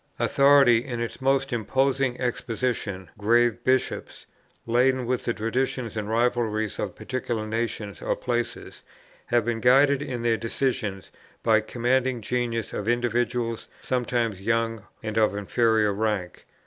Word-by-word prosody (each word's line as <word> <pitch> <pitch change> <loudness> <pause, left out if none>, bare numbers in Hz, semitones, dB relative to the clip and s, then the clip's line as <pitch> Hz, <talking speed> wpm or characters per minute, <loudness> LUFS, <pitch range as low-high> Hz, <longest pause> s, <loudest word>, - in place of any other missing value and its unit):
Authority 140 -4 +5
in 120 -3 -5
its 120 +2 -4
most 135 0 +1
imposing 130 +2 0
exhibition, 115 -7 -2
grave 120 +2 +2
bishops, 130 0 -1 0.4
laden 125 +2 +2
with 125 +1 -1
the 120 - 0
traditions 125 +2 -2
and 105 -1 -3
rivalries 115 -2 0
of - - -3
particular 120 -4 -3
nations 110 -2 -3
or - - 0
places, 120 -1 -3 0.5
have 120 -2 +2
been 120 -1 -1
guided 140 +2 +5
in 125 -5 -4
their 115 -1 +2
decisions 115 -3 -2 0.3
by 110 -2 +4
the 110 - -10
commanding 125 +1 +1
genius 115 0 -2
of 105 - -4
individuals, 120 -1 0
sometimes 120 -5 -1
young 115 0 -1 0.2
and 110 0 -3
of 105 -2 +2
inferior 110 0 +2
rank. 100 -4 -2
120 Hz, 135 wpm, -25 LUFS, 110-125 Hz, 0.5 s, Authority